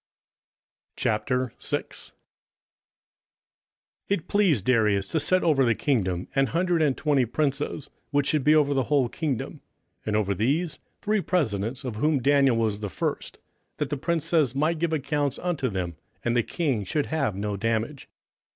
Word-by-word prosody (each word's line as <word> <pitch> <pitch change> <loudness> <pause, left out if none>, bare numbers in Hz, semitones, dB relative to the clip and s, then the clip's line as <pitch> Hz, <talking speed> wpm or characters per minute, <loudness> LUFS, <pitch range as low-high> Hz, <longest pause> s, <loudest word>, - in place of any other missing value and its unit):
27:006:001 125 +3 -2 2.0
It 190 -3 -1
pleased 180 - +2
Darius 105 -6 +2
to 160 - +1
set 185 +4 +3
over 150 -5 +4
the 115 -3 +3
kingdom 95 - 0
an 135 0 +3
hundred 170 +4 +1
and 145 -4 +2
twenty 145 -4 +2
princes, 140 +3 -2 0.2
which 145 -1 +1
should 150 -1 +1
be 150 +2 +5
over 145 -2 +3
the 135 -2 +1
whole 140 -4 +2
kingdom; 140 -2 -3 0.4
27:006:002 - - -48
And 105 - 0
over 100 -2 +1
these 145 - 0 0.2
three 210 -1 +1
presidents; 125 - -1
of 120 -5 -4
whom 150 +4 +2
Daniel 135 -2 +4
was 110 -3 0
first: 105 -6 -3 0.4
that 150 0 -2
the - - +1
princes 160 -3 +1
might 155 +3 +1
give 170 0 0
accounts 145 -2 -1
unto 165 -8 -1
them, 90 -5 -4 0.3
and 120 0 +1
the 120 - +4
king 135 - -1
should 145 +10 -1
have 140 -10 -1
no 100 +1 -2
damage. 115 +6 -2
135 Hz, 150 wpm, -26 LUFS, 115-155 Hz, 2.0 s, be